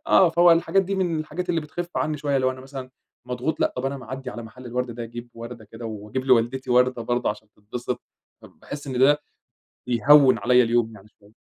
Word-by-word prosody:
آه 185 - +6
فهو 170 +1 +6
الحاجات 170 +3 +3
دي 195 +1 -3
من 175 -4 0
الحاجات 175 +4 -5
اللي 170 -2 +1
بتخفّ 175 +3 -6
عني 155 0 0
شوية، 140 -1 0
لو 130 0 +2
أنا 130 0 -8
مثلًا 135 -1 -8 0.3
مضغوط 125 +5 -3
لأ، - - +2
طَب 125 - -3
أنا 140 +1 -2
معدّي 130 0 -7
على 115 +3 -7
محل 125 +3 -11
الوَرْد 125 0 -2
ده، 120 +1 -6
أجيب 120 +1 -8
وردة 115 -1 -9
كده 115 +3 -11
وأجيب 110 +4 -5
لوالدتي 130 +1 +2
وردة 125 -1 +3
برضه 120 0 0
عشان 105 0 -9
تتبسط، 120 +4 -5 0.4
فباحس 145 0 -10
إن 130 -2 -3
ده 145 +3 +5 0.7
بيهوّن 130 +3 +6
عليَّ 125 0 +4
اليوم 115 -1 +1
يعني 105 +1 -15
شوية. 105 +1 -22
130 Hz, 205 wpm, -24 LUFS, 120-145 Hz, 0.7 s, آه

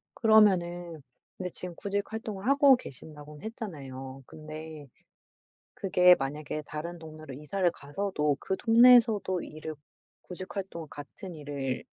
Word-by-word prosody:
그러면은 175 - +3 0.4
근데 180 -1 -4
지금 180 0 -8
구직 200 +2 -3
활동을 215 -2 -5
하고 275 0 +7
계신다고는 150 - -11
했잖아요. 135 - -7
근데 155 -1 -9 0.9
그게 180 -1 +5
만약에 150 +2 -4
다른 170 +3 -6
동네로 155 -3 -10
이사를 175 +6 0
가서도 150 -2 -2
그 190 - -2
동네에서도 230 -5 +5
일을 155 0 -7 0.5
구직 185 +2 -9
활동 175 -5 -5
같은 145 +6 -9
일을 140 -4 -4
170 Hz, 290 characters per minute, -29 LUFS, 150-200 Hz, 0.9 s, 하고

